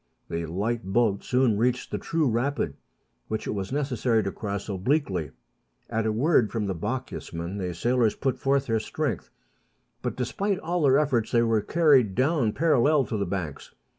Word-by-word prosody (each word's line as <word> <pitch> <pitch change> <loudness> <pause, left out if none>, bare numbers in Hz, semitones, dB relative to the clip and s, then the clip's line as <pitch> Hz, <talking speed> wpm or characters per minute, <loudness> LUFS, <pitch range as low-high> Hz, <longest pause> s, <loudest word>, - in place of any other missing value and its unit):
The 85 0 -3
light 110 +8 -2
boat 100 +1 +1
soon 125 -5 +2
reached 125 +2 0
the - - -2
true 165 -3 0
rapid, 120 - -1 0.5
which 110 - -3
it - - -2
was 100 0 -4
necessary 130 -5 +1
to 100 - -2
cross 100 -1 -4
obliquely. 100 - 0 0.6
At 110 -1 0
a - - +2
word 120 0 +3
from 110 -3 -1
the 95 - -1
Bochjesman, 90 -3 -4
the 90 -2 -2
sailors 120 +3 +2
put 135 -2 -1
forth 135 0 +1
their 115 -3 +1
strength; - - -3 0.7
but, - - -3
despite 195 - -1
all 175 -1 -2
their 135 -2 +5
efforts, 135 -7 +1
they 120 -1 +4
were 115 -2 +2
carried 135 - +3
down 130 -3 +2
parallel 150 -2 +3
to 110 - -3
the 100 -2 -1
banks. 85 -6 -5
115 Hz, 170 wpm, -26 LUFS, 100-135 Hz, 0.7 s, their